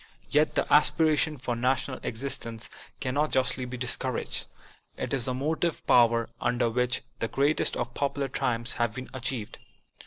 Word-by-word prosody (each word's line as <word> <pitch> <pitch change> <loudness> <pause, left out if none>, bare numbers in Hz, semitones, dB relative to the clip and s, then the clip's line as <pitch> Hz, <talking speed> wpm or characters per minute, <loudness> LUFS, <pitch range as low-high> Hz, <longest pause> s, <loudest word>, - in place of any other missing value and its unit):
Yet 150 +1 +3
the - - +2
aspiration 150 +1 +4
for 125 -1 -3
national 130 +2 0
exist 135 +5 -2
ence 115 0 -7 0.3
cannot 140 +4 0
justly 130 -1 +1
be 125 +1 -6
discouraged. 125 0 -1 0.5
It - - -3
is 130 -3 0
the 130 -1 -1
motive 160 +5 -1
power 115 -1 +4
under 120 -1 +1
which 125 +1 0 0.2
the 115 - 0
greatest 140 +6 +1
of - - -3
popular 140 0 -1
triumphs 120 -3 -1
have 115 -2 +1
been 130 0 -7
achieved. 125 -4 -4
130 Hz, 155 wpm, -28 LUFS, 120-140 Hz, 0.5 s, aspiration